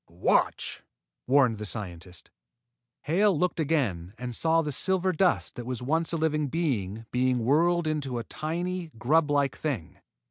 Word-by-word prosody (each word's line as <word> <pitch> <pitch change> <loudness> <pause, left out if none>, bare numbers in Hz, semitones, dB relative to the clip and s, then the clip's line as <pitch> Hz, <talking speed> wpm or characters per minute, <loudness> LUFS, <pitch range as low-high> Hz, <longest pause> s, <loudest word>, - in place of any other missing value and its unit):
"Watch!" 85 +1 +1 0.5
warned 130 -4 +4
the 105 - -4
scientist. 90 -4 -7 0.7
Hale 185 +4 +2
looked 180 +2 0
again 115 - -1
and 125 0 -5
saw 165 +6 +2
the 150 - -3
silver 190 +5 +1
dust 180 +1 +1
that 120 - -7
was 125 -1 -4
once 160 +5 +1
a 165 - 0
living 155 -2 0
body 115 - -2
being 125 -2 +1
whirled 170 +5 +3
into 145 -5 -2
a 120 - -3
tiny, 170 +6 -4
grublike 145 +2 +2
thing. 135 - -4
145 Hz, 145 wpm, -27 LUFS, 120-165 Hz, 0.7 s, warned